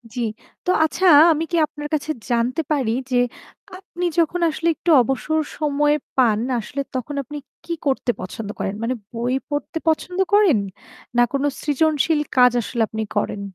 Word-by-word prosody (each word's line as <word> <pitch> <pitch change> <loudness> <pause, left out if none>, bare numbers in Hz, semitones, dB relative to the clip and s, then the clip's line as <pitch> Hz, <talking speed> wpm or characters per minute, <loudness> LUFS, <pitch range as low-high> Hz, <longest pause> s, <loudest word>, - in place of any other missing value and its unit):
জি। - - -3 0.5
তো - - -2
আচ্ছা 330 +4 0 0.3
আমি 315 +1 -2
কি 340 - +1
আপনার 295 0 -7
কাছে 300 0 -1 0.2
জানতে 240 +5 +1
পারি 265 -7 +1 0.2
যে, - - +1 0.6
আপনি 360 -2 -6
যখন 335 +2 +1
আসলে 320 +2 -3
একটু 345 - -4
অবসর 270 +6 0 0.2
সময়ে 295 0 +2 0.2
পান 230 -5 +3 0.2
আসলে 265 +5 -4
তখন 260 +3 -3
আপনি 295 +4 -8 0.3
কি 340 - -3
করতে 265 -3 +1
পছন্দ 205 +3 -6
করেন? 195 - -2
মানে 245 +3 0 0.2
বই 240 +2 -1 0.2
পড়তে 290 +2 -3
পছন্দ 360 +3 0
করেন 405 - +5 0.6
না - - +6
কোনো 280 +1 +1
সৃজনশীল 305 +1 +1 0.2
কাজ 250 -1 +7
আসলে 235 +2 -3
আপনি 220 +2 -4
করেন? 205 0 -1
290 Hz, 160 wpm, -21 LUFS, 245-315 Hz, 0.6 s, কাজ